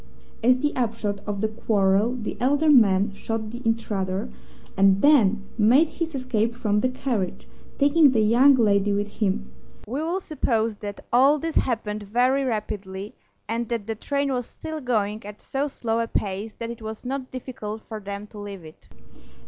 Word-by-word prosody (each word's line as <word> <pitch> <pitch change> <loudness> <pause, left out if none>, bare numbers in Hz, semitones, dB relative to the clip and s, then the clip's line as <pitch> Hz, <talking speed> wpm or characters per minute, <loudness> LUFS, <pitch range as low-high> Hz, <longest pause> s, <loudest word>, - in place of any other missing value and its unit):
As 250 +2 +5
the 295 0 0
upshot 220 -4 -1
of 200 -1 -3
the 220 - +2
quarrel 215 +1 +1
the 225 -4 -4
elder 290 +5 +3
man 200 -6 +5
shot 220 +1 -4
the 240 +1 -7
intruder, 205 -5 -1 0.5
and 195 0 +4
then 220 -9 +4
made 260 +10 +5
his 330 -3 -4
escape 235 -3 -1
from 210 -4 +1
the 255 - +1
carriage, 245 -7 -3 0.3
taking 290 +1 +5
the 235 -4 +2
young 245 +6 +6
lady 205 -4 +3
with 205 +1 -3
him. 190 - -1 0.3
We 260 +7 -3
will 340 +4 -1
suppose 230 - -1
that 205 -1 -7
all 270 +5 +6
this 325 +2 -3
happened 215 -6 -1
very 250 +6 +2
rapidly, 205 -4 -4 0.3
and 230 +1 -2
that 230 -4 -2
the 225 - -2
train 280 +5 -1
was 245 -2 -2
still 315 -1 -7
going 215 -4 -1
at 205 0 -9
so 275 +2 -2
slow 230 -5 -2
a 230 - 0
pace 205 +1 -3
that 230 0 -4
it 235 - -9
was 220 +2 -7
not 265 0 -4
difficult 225 -4 -6
for 220 -1 -6
them 200 0 -6
to 210 - -9
leave 200 -4 -8
it. 155 - -15
225 Hz, 175 wpm, -24 LUFS, 205-255 Hz, 0.5 s, young